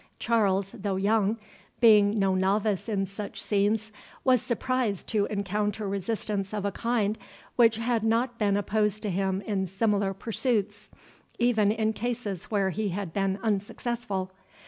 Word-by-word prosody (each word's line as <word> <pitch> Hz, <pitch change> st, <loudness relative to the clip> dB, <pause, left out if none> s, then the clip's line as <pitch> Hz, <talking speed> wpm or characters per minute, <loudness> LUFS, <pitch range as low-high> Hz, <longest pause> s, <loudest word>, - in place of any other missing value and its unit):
Charles, 200 Hz, -4 st, +1 dB
though 195 Hz, -1 st, -3 dB
young, 210 Hz, +2 st, +2 dB, 0.4 s
being 210 Hz, -2 st, +6 dB
no 195 Hz, -2 st, +2 dB
novice 200 Hz, +3 st, +1 dB
in 195 Hz, -2 st, 0 dB
such 200 Hz, +2 st, -7 dB
scenes, 210 Hz, +2 st, 0 dB, 0.3 s
was 255 Hz, -3 st, +4 dB
surprised 245 Hz, -4 st, -1 dB
to 210 Hz, -2 st, +2 dB
encounter 205 Hz, +1 st, -2 dB
resistance 200 Hz, 0 st, -2 dB
of 205 Hz, -1 st, -2 dB
a 200 Hz, -, 0 dB
kind 220 Hz, 0 st, 0 dB, 0.4 s
which 230 Hz, -2 st, +5 dB
had 230 Hz, 0 st, 0 dB
not 235 Hz, +2 st, +1 dB
been 205 Hz, -2 st, +2 dB
opposed 210 Hz, +1 st, 0 dB
to 210 Hz, -, -1 dB
him 190 Hz, +1 st, 0 dB
in 195 Hz, -2 st, -2 dB
similar 200 Hz, 0 st, 0 dB
pursuits, 210 Hz, -1 st, -1 dB, 0.5 s
even 220 Hz, -4 st, +3 dB
in 220 Hz, 0 st, 0 dB
cases 220 Hz, -5 st, -3 dB
where 195 Hz, -3 st, 0 dB
he 210 Hz, +3 st, -1 dB
had 185 Hz, -2 st, -4 dB
been 195 Hz, -1 st, 0 dB
unsuccessful. 205 Hz, -1 st, -2 dB
210 Hz, 145 wpm, -27 LUFS, 195-225 Hz, 0.5 s, being